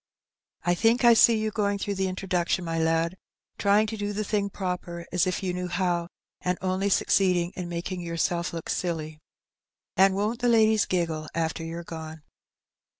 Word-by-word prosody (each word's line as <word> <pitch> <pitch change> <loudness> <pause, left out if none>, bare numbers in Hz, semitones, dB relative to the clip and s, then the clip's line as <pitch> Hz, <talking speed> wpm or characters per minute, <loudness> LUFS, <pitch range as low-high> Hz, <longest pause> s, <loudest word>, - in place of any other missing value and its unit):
"I 175 - +2
think 230 +7 +3
I 235 - +9
see 230 0 +6
you 215 0 -1
going 205 -2 0
through 200 0 -2
the 190 -1 -1
introduction, 185 -1 -1
my 165 0 -2
lad, 165 +2 +1 0.4
trying 205 +1 +4
to 220 +1 -4
do 205 -1 -3
the 215 +1 -2
thing 205 -1 -1
proper 180 -3 -4
as 180 +1 +2
if 185 - -2
you 185 -1 -1
knew 180 0 -3
how, 175 -1 0 0.3
and 180 0 -1
only 190 +2 0
succeeding 180 -3 +2
in 180 -1 -5
making 175 +1 -4
yourself 170 +1 -1
look 165 -1 -6
silly. 155 -4 -3 0.8
And 190 +1 +5
won^t 210 +4 -1
the 245 -1 +2
ladies 220 -2 +4
giggle 165 -4 -1
after 165 0 -1
you^re 165 +1 -6
gone 160 -2 -8
180 Hz, 175 wpm, -26 LUFS, 170-200 Hz, 0.8 s, I